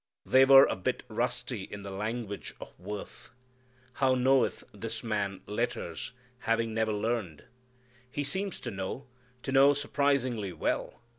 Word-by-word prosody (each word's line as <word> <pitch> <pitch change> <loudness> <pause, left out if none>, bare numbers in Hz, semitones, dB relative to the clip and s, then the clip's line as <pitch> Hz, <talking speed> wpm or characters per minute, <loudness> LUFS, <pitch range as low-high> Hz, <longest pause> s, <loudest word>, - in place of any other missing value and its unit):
They 130 0 +6
were 135 0 +9
a - - -1
bit 95 - -2
rusty - - -2
in 100 0 -8
the 100 - -6
language 105 +1 -4
of - - -10
worth. 100 +3 -7 0.6
How 130 -1 +3
knoweth 130 0 +3
this - - -5
man 100 -4 -2
letters, 105 -6 -3 0.3
having 115 -1 0
never 110 0 +1
learned! 105 -6 -2 0.7
He 145 +3 -2
seems 190 +6 -3
to 120 - -4
know, 95 +7 -4 0.4
to 135 - -3
know 135 +2 +6
surprisingly 135 -8 0
well. 85 - -2
115 Hz, 140 wpm, -30 LUFS, 100-135 Hz, 0.7 s, were